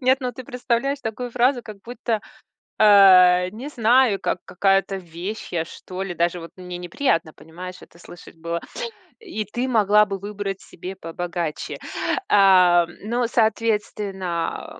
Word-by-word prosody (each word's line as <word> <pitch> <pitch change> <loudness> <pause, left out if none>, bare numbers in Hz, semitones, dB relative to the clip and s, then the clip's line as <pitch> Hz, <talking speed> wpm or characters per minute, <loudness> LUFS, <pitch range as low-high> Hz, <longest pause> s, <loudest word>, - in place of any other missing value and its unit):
Нет, 260 +1 +3
ну 250 -1 -3
ты 255 +2 -9
представляешь 250 +3 -1
такую 240 +1 -5
фразу, 250 +1 +2
как 215 -2 -10
будто, 235 -2 -3 0.6
а, 185 -3 +7
не 235 +8 -8
знаю, 240 -5 +3
как 185 - -1
какая-то 195 +1 +1
вещь 180 +4 -7
я, 165 -2 0
что 185 +2 -8
ли. 190 -2 -4
Даже 170 +1 0
вот 165 -1 -10
мне 180 -1 -7
неприятно, 170 - -1
понимаешь, 180 +3 -10
это 170 - -17
слышать 175 -1 -14
было: 170 +1 -4 0.6
"И 345 - -5
ты 240 +6 -3
могла 210 -3 +4
бы 195 -2 -5
выбрать 200 -1 -5
себе 185 +2 -9
побогаче". 170 -2 -5 0.5
А, 185 -3 +6 0.2
но, 235 +3 0
соответственно, 210 -6 -1
а, - - -17
195 Hz, 145 wpm, -22 LUFS, 180-230 Hz, 0.6 s, а